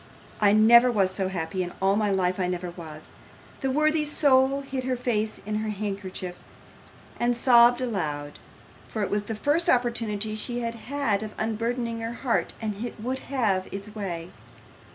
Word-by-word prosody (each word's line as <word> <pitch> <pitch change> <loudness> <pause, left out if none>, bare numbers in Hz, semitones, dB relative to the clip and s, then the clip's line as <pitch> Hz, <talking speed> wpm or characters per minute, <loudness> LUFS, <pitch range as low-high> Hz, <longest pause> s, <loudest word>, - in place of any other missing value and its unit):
I 205 -1 +6
never 235 +4 +7
was 195 -5 +2
so 190 0 -1
happy; 185 0 -3
in 175 -1 -4
all 195 +1 +3
my 210 0 +1
life 185 -1 +1
I 180 - +1
never 180 -1 -3
was!' 155 -3 -10 0.5
The 270 - -1
worthy 305 +3 +2
soul 275 -2 +3
hid 270 -1 -4
her 255 0 0
face 220 -3 -1
in 210 0 -2
her 215 0 -2
handkerchief, 195 -3 -5 0.8
and 240 0 +1
sobbed 240 0 +6
aloud; 150 - -3 0.5
for 215 - -3
it - - -3
was 205 0 0
the 225 - -4
first 295 +9 +1
opportunity 230 -4 +1
she 240 +3 -3
had 230 -1 -2
had 230 -3 -1
of 215 -1 -7
unburdening 230 +1 -2
her 225 +1 -4
heart, 240 0 -1
and 215 -1 -4
it 240 -2 -6
would 255 +4 -3
have 205 -9 +1
its 200 +2 -7
way. 180 -5 -5
220 Hz, 175 wpm, -26 LUFS, 195-245 Hz, 0.8 s, never